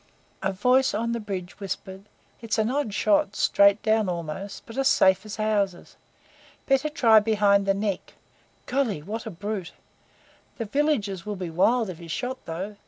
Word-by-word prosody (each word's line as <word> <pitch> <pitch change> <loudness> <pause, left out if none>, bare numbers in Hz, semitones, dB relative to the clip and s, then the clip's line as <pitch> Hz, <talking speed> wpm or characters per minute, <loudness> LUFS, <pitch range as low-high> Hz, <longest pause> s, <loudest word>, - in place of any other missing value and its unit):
A 195 - 0
voice 250 +6 +2
on 230 +2 -1
the 235 - -2
bridge 195 -4 -6
whispered: 195 0 -6 0.4
"It's 230 -1 -2
an 220 +2 +1
odd 275 -5 -1
shot 205 0 +2
straight 200 0 +4
down 220 -2 +2
almost 170 +3 -5
but 230 - -11
as 270 - +3
safe 190 -4 +4
as 210 - -6
houses. 205 -4 -1 0.7
Better 270 +2 +2
try 230 -8 +5
behind 205 -2 +2
the 195 - +3
neck. 200 -1 -3 0.5
Golly! 245 - -1
what 220 +6 -5
a - - -3
brute! 200 -1 -5 0.8
The 230 - -3
villagers 215 - 0
will 210 0 -4
be 180 -3 -5
wild 225 +7 +2
if 170 - -11
he's 170 -1 -11
shot, 255 +7 -4
though. 190 +6 -5
210 Hz, 170 wpm, -25 LUFS, 190-230 Hz, 0.8 s, try